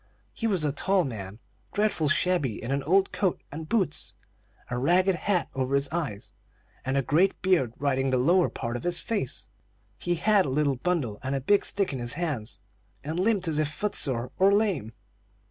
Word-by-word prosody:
He 230 - -2
was 190 -7 0
a 150 - +1
tall 190 +6 +2
man, 105 - -6 0.4
dreadful 205 -8 +1
shabby 155 - +1
in 120 - -3
an 140 0 0
old 190 +7 +2
coat 190 -4 0
and 155 +2 -7
boots, 190 -10 0 0.5
a 125 - -4
ragged 185 +7 +3
hat 180 +1 0
over 135 +1 0
his 140 0 +3
eyes, 150 -12 -4 0.5
and 130 +1 -1
a 135 - +2
great 175 +10 +2
beard 165 -11 +2
hiding 135 -1 +1
the 130 - +2
lower 170 +8 +3
part 115 +1 -4
of 120 - -5
his 175 0 0
face. 205 - -3 0.5
He 175 0 0
had 200 +1 +3
a - - -2
little 140 0 +1
bundle 135 -10 -1
and 130 +1 -2
a - - 0
big 200 +10 +3
stick 200 -6 0
in 130 - -3
his 120 0 -1
hands, 145 -9 -3 0.4
and 160 +4 -3
limped 195 -2 +1
as 155 -2 0
if 155 - +2
foot 210 +5 -2
sore 125 -2 0
or 195 +1 +6
lame. 195 - +1
155 Hz, 195 wpm, -27 LUFS, 130-185 Hz, 0.5 s, or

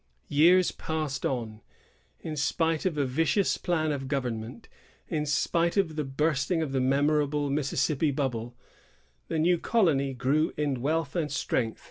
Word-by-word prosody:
Years 175 +5 +5
passed 155 -4 -3
on. 115 -4 -4 0.6
In 155 -2 -5
spite 160 +4 0
of 165 -5 -3
a 145 - +2
vicious 165 +9 +1
plan 160 -4 0
of 135 -2 -3
government, 125 - -4 0.4
in 150 -2 -2
spite 170 +4 +1
of 170 -6 +1
the 155 - -1
bursting 150 +4 0
of 145 - -4
the 135 -1 0
memorable 145 +2 +1
Mississippi 140 +1 0
bubble, 125 -4 -3 0.7
the 165 - -2
new 170 +2 +3
colony 145 - +1
grew 145 +6 +1
in 140 -4 -1
wealth 160 +6 -1
and 155 -4 -1
strength. 120 -4 -1
150 Hz, 145 wpm, -28 LUFS, 135-160 Hz, 0.7 s, Years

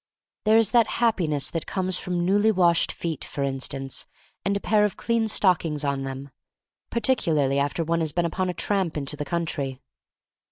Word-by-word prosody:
There 215 +1 +5
is 225 -3 +4
that 235 -3 +4
happiness 170 - +1
that 165 - -4
comes 185 -1 0
from 175 -2 -2
newly 205 +4 +3
washed 175 -4 +3
feet, 165 -3 -3
for 140 - -3
instance, 135 0 -3 0.4
and 200 +1 0
a - - -4
pair 210 +1 +2
of 210 - 0
clean 230 -1 0
stockings 170 -8 +2
on 140 -1 -1
them, 135 +1 -7 0.6
particularly 160 - +1
after 145 +4 0
one 165 +1 0
has 160 -2 0
been 175 +3 0
upon 185 +2 -1
a - - -2
tramp 190 -6 -1
into 145 0 -3
the 145 0 -5
country. 140 -5 -3
170 Hz, 175 wpm, -25 LUFS, 145-200 Hz, 0.6 s, There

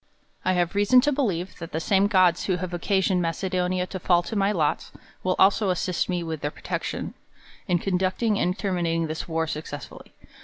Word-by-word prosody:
I 185 - +2
have 175 -1 0
reason 205 +5 +5
to 290 +2 +1
beheve, 195 - -2
that 165 - -8
the 160 - 0
same 195 +4 +3
gods, 185 -4 +3
who 185 - +1
have 180 0 -5
occasioned 190 +1 +1
Macedonia 180 +1 -1
to 190 +1 -6
fall 175 0 +3
to 220 - -6
my 200 0 +2
lot, 160 -7 0 0.3
w^ill 185 0 +1
also 200 +1 +4
assist 180 0 -1
me 175 -1 -1
with 160 -3 -5
their 145 - -1
protec - - -4
'tion - - -4 0.5
in 175 - +3
conducting 190 +4 0
and 180 +2 0
terminating 170 -4 0
this 155 0 -5
war 165 -1 0
success 150 -2 -6
Y^lly. - - -13
180 Hz, 195 wpm, -25 LUFS, 170-195 Hz, 0.5 s, reason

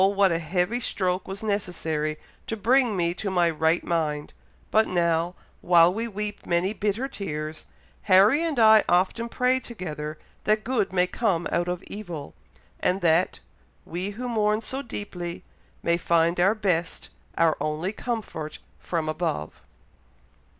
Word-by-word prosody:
what 195 -2 +4
a 165 - +1
heavy 180 +8 0
stroke 185 -5 -1
was 195 +3 -6
necessary 160 -7 -2 0.3
to 225 - -3
bring 240 0 +3
me 170 -1 +1
to 200 +2 -4
my 175 -2 +3
right 160 +1 +1
mind, 150 -3 -1 0.4
but 220 +1 +4
now, 170 0 +1 0.3
while 175 0 +5
we 225 +3 -2
weep 210 -1 -5
many 175 +4 +1
bitter 215 +4 -1
tears, 155 - -5 0.4
Harry 200 - +6
and 325 -5 -1
I 220 -2 +7
often 190 +6 +2
pray 255 +2 +2
together 155 -11 -6 0.3
that 215 0 +2
good 245 -6 0
may 180 -1 +3
come 180 -3 0
out 175 +1 +1
of 180 0 -3
evil, 175 -8 -7 0.5
and 185 +2 +1
that 170 +2 +2 0.4
'we 180 +4 -3
who 250 +1 -3
mourn 215 -2 +1
so 265 +5 -4
deeply, 180 -8 -6 0.4
may 170 0 +2
find 170 0 +2
our 195 +5 +4
best, 180 -6 -1 0.3
our 165 -2 +4
only 155 +5 -1
comfort 210 -10 -4 0.2
from 165 -3 -2
above'." 155 - -3
180 Hz, 145 wpm, -26 LUFS, 165-215 Hz, 0.5 s, I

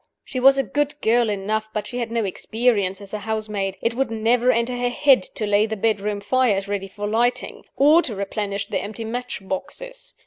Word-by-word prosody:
She 255 - -4
was 270 +2 +6
a 270 - +2
good 290 +2 -1
girl 230 0 +3
enough, 210 +2 -2
but 210 -1 -2
she 245 - -4
had 235 -2 -2
no 230 -2 0
experience 205 -1 0
as 200 0 -11
a 210 - -2
housemaid: 210 -3 -3
it 230 - +1
would 265 +1 0
never 230 +3 +2
enter 235 +1 0
her 245 0 0
head 265 -1 +4
to 215 - -2
lay 205 +1 +3
the 220 0 -4
bedroom 210 -1 0
fires 205 -3 +1
ready 200 -1 -3
for 205 +2 -6
lighting, 235 +3 0
or 300 +5 +6
to 235 -10 -4
replenish 200 0 -3
the - - -2
empty 220 +2 -6
match 240 -4 -5
boxes. - - -5
220 Hz, 205 wpm, -22 LUFS, 205-250 Hz, -, was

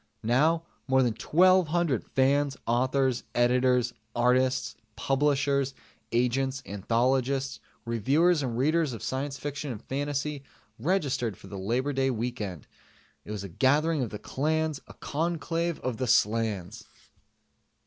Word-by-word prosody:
Now 155 +9 +3 0.2
more 130 0 +4
than 120 -3 +1
twelve 180 +9 +4
hundred 160 -6 0
fans, 135 +1 +1
authors, 130 +1 +1
editors, 125 0 +3 0.2
artists, 125 -1 +2 0.2
publishers, 140 -1 +1 0.4
agents, 130 +3 0
anthologists, 130 +6 0 0.3
reviewers 145 - +2
and 120 -4 -2
readers 155 +1 +2
of 115 - -7
science 135 +2 -3
fiction 145 0 -4
and 110 - -6
fantasy 145 +1 -2 0.4
registered 135 - 0
for - - -15
the 100 - -7
Labor 125 +9 -1
Day 135 0 +1
Weekend 110 - -4 0.9
gathering 150 +3 +3
of 120 - -2
the 105 - -6
clans, 155 +4 -1
a - - -13
conclave 165 +1 -2
of 125 -3 -3
the 130 - -2
slans. 110 -5 +1
130 Hz, 120 wpm, -28 LUFS, 120-145 Hz, 0.9 s, more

